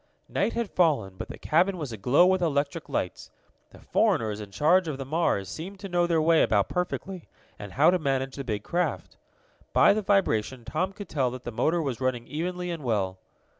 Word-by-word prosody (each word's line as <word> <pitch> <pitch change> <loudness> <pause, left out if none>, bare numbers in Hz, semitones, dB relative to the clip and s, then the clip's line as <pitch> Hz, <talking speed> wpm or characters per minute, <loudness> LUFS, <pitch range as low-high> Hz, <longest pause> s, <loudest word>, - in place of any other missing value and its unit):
Night - - 0
had 235 -3 -2
fallen, 140 - +1
but - - -6
the - - -9
cabin 180 +4 +2
was 150 -7 -5
aglow 125 - +3
with 185 0 +3
electric 145 -1 -1
lights. 90 - -3 0.4
The - - -16
foreigners 110 -2 0
in 105 - -8
charge 165 - +3
of 150 -4 -3
the 135 - -5
Mars 140 - 0
seemed 185 - -7
to 200 - -5
know 175 -1 +2
their 165 -2 +2
way 160 +1 +4
about 100 -2 +2
perfectly, 180 0 -4 0.3
and 100 -1 -8
how 155 +5 +5
to 185 - +1
manage 135 -3 -1
the 140 - -5
big 105 -5 -3
craft. 175 +1 -2 0.6
By - - +6
the 215 - -1
vibration 130 - +1
Tom 170 +9 -1
could 205 +1 -9
tell 135 -4 0
that 125 0 -8
the 120 - -5
motor 165 +9 +1
was 135 -4 -3
running 125 -2 -1
evenly 180 +5 -3
and 165 -4 -5
well. 95 -6 -1
150 Hz, 205 wpm, -27 LUFS, 120-180 Hz, 0.6 s, By